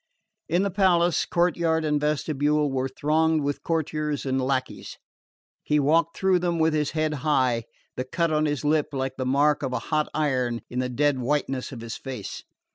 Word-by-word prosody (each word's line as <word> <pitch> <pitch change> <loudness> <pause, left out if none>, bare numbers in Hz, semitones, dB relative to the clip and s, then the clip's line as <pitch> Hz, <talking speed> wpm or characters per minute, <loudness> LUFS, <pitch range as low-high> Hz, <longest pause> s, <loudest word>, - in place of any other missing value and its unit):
In 175 +4 +2
the 200 - -1
palace, 175 -3 +2
courtyard 170 -2 +1
and 150 -1 +1
vestibule 150 0 +1
were 135 0 -1
thronged 155 +3 +1
with 145 0 -2
courtiers 155 -3 -2
and 130 0 0
lacqueys. 130 0 -3 0.6
He 150 - +1
walked 160 +3 +2
through 190 -1 +3
them 175 -1 -1
with 160 -1 +2
his 150 -2 +1
head 155 0 +1
high, 130 -6 +1 0.3
the 130 - -2
cut 165 +5 -1
on 155 0 +2
his 145 -1 -2
lip 150 0 +2
like 135 -1 -3
the 130 -1 -2
mark 145 +3 +3
of 130 -3 -3
a - - +1 0.2
hot 155 0 +2
iron 130 -6 0
in 125 - -2
the 125 0 -1
dead 145 +2 +1
whiteness 135 0 -1
of 125 -4 -8
his 115 0 -6
face. 130 -7 -7
150 Hz, 185 wpm, -25 LUFS, 130-160 Hz, 0.6 s, through